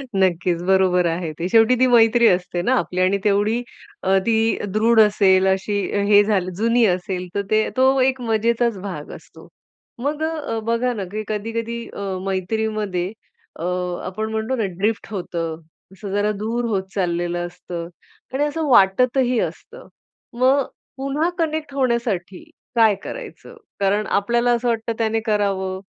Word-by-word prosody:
नक्कीच. 180 -2 +1
बरोबर 185 -2 +3
आहे 165 -1 -2
ते. 170 - -1
शेवटी 225 +3 +5
ती 255 - +5
मैत्री 235 0 +5
असते 180 -2 +1
ना 245 - +1
आपली 185 0 -2
आणि 185 +2 +3
तेवढी 210 +3 +2 0.4
अ, 190 +1 +3
ती 225 0 +2 0.2
दृढ 225 +1 +4
असेल 195 -3 +4
अशी 190 +2 0 0.3
हे 205 0 +6
झालं 195 -3 0
जुनी 230 +1 +3
असेल 180 -1 -1
तर 200 - +1
ते 215 0 +2
तो 260 - +5 0.2
एक 260 0 +1
मजेचाच 230 0 +1
भाग 175 -7 -6
असतो. - - -15 0.5
मग 295 +4 -2
अ, 310 -8 -2
बघा 240 +2 +1
ना 210 -4 -4
की 215 +1 -3
कधी-कधी 230 +2 -3
अ, - - -8 0.3
मैत्रीमध्ये 195 -1 -2 0.5
अ, - - -5 0.4
आपण 215 +4 -4
म्हणतो 220 +4 -1
ना - - +1
ड्रिफ्ट 210 +3 -1
होतं. 170 -4 -4 0.3
असं 195 +1 -8
जरा 205 +1 +1
दूर 235 +3 -1
होत 200 -5 -1
चाललेल 175 -2 -1
असतं 175 -1 -6 0.5
आणि 275 +2 +1
असं 300 +1 -1
वाटतही 250 +4 +4
असतं. 480 +2 -6 0.5
मग 260 +3 +3 0.3
पुन्हा 275 +5 -1
कनेक्ट 310 -3 -2
होण्यासाठी 235 -9 -1 0.3
काय 220 -3 +5
करायचं? - - -9 0.2
कारण 200 +2 +1
आपल्याला 235 +4 +1
असं 240 0 0
वाटतं 230 -1 -1
त्याने 225 -1 0
करावं, 195 -3 0
215 Hz, 150 wpm, -21 LUFS, 190-235 Hz, 0.5 s, हे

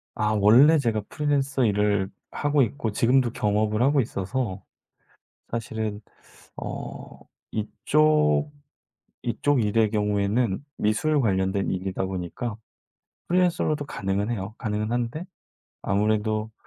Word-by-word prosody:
아 105 0 0
원래 125 +11 +7
제가 115 -5 0
프리랜서 140 -3 0
일을 105 -2 +1 0.2
하고 145 -1 +1
있고 115 -1 -1
지금도 120 +3 +2
겸업을 105 +1 0
하고 140 +2 +4
있어서. 100 -2 -3 0.9
사실은 110 -2 -3 0.6
어 - - -7 0.3
이쪽, 110 - +2 0.7
이쪽 130 +2 +1
일의 105 0 +2
경우에는 105 +2 0
미술 145 +9 +1
관련된 95 -4 +1
일이다 95 0 -2
보니까 95 +5 -4 0.7
프리랜서로도 170 -4 +1
가능은 100 -1 -2
해요. 100 -3 -4
가능은 105 -2 -2
한데 120 +7 -2 0.6
아무래도 110 +2 0
110 Hz, 255 characters per minute, -25 LUFS, 100-130 Hz, 0.9 s, 원래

